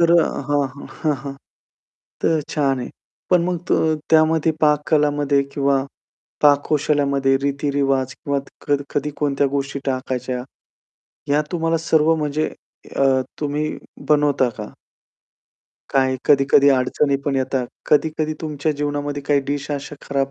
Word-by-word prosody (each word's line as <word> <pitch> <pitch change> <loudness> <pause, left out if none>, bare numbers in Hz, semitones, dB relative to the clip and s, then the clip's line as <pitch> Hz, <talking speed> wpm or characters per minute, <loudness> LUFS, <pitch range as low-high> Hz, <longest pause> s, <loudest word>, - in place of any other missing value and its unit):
तर 170 0 +5
अ - - +1 0.2
हां, 145 0 +2
हां, 140 +2 -11 0.2
हां, 155 -2 +2
हां. 140 - -4 0.9
तर 160 -1 +3
छान 135 -3 +1
आहे. 125 - -5 0.4
पण 180 -2 +4
मग 180 0 -1
त - - +4 0.4
त्यामध्ये 160 0 +4
पाककला 150 0 +3 0.4
किंवा 140 -1 +1 0.6
पाककौशल्यामध्ये 145 -2 +3
रीती-रिवाज 140 -1 0
किंवा 140 +1 -2
क 135 - -21
कध 145 -1 +1
कधी 145 +1 0
कोणत्या 140 -1 +1
गोष्टी 140 0 -2
टाकायच्या, 130 -1 -2 0.9
ह्या 145 +1 +3
तुम्हाला 165 -1 0
सर्व 160 0 +4
म्हणजे 155 0 -1 0.5
अ, - - +2 0.4
तुम्ही 150 +1 -1 0.4
बनवता 145 -3 +3
का? 105 - -5 1.3
काय 130 -1 +2
कधी-कधी 140 0 +5
अडचणी 140 +2 +2
पण 140 -2 0
येतात. 130 -1 -1 0.2
कधी-कधी 155 +1 +1
तुमच्या 155 -1 -2
जीवनामध्ये 145 0 -3
काही 145 0 +2
डिश 145 +1 -3
अशा 145 +1 -5
खराब 140 -1 0
145 Hz, 130 wpm, -21 LUFS, 135-150 Hz, 1.3 s, तर